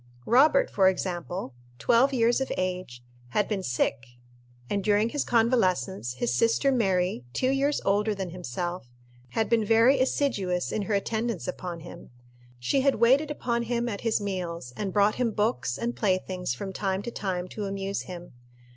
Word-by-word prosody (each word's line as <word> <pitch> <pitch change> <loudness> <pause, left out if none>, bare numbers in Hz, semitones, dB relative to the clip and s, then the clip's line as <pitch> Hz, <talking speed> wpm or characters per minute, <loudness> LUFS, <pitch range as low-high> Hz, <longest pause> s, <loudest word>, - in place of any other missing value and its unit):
Robert, 305 - +4
for 190 -2 +4
example 180 -4 -4 0.2
twelve 235 - +3
years 240 0 +2
of 265 - -2
age 180 -10 -3 0.3
had 210 - +2
been 205 -3 -2
sick, 125 -3 -1 0.6
and 200 +5 -1
during 210 +2 +3
his 290 +3 -1
convalescence 195 - +1
his 120 -1 -1
sister 230 - +3
Mary, 185 - +1
two 255 - +1
years 280 +2 +1
older 205 +2 +2
than 190 -3 -4
himself, 175 -2 -5 0.4
had 220 - +1
been 230 -2 +2
very 230 +5 +4
assiduous 210 -10 0
in 215 - -1
her 205 +1 -1
attendance 220 -1 -2
upon 180 -2 -5
him. 170 +1 -11 0.5
She 125 - +1
had 275 0 +3
waited 265 +7 +4
upon 235 -5 -1
him 235 0 -1
at 205 -4 -4
his 225 -2 +1
meals, 175 -9 -4
and 200 -2 -3
brought 205 +1 +3
him 240 - +2
books 130 - 0
and 240 +1 -2
playthings, 185 - -1
from 190 +8 -6
time 195 0 -2
to 235 - -5
time, 185 -4 -3
to 210 - -5
amuse 195 0 -3
him. 175 -4 -9
200 Hz, 165 wpm, -27 LUFS, 180-235 Hz, 0.6 s, Robert